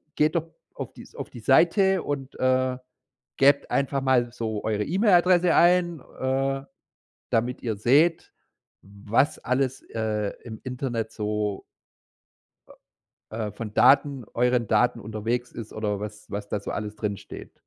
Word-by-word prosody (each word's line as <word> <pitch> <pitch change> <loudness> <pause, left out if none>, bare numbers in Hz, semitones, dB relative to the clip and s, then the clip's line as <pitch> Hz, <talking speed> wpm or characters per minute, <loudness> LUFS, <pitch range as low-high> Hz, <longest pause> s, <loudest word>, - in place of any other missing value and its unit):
geht 155 +3 +2
doch 165 0 -1 0.3
auf - - -6
die - - -12
auf - - -6
die 120 - -10
Seite 180 - +4
und, 140 -2 -4
äh, 130 0 +2 0.6
gebt 140 +1 +4
einfach 140 0 0
mal 125 -3 +2
so 110 -3 -4
eure 105 -1 0
E-Mail-Adresse 180 - +4
ein, 175 -2 +4 0.2
äh, 135 +1 0 0.7
damit 120 +2 0
ihr 110 -3 -1
seht, 150 +10 +3 0.5
was 100 +7 0
alles, 130 +1 -1
äh, 105 -2 -1
im 110 -2 -9
Internet 125 -3 -3
so” 105 -1 -2 1.7
„äh, 110 - -6
äh, 105 - -6
von 105 0 -7
Daten 140 -3 +4
euren 125 -1 +2
Daten 115 +2 +2
unterwegs 115 +3 -3
ist 110 -2 -8
oder 105 -2 -2
was 105 0 -8
was 100 0 -5
da 105 - -1
so - - -6
alles 105 0 -4
drinsteht.” 105 -2 -6
125 Hz, 140 wpm, -25 LUFS, 105-140 Hz, 1.7 s, Seite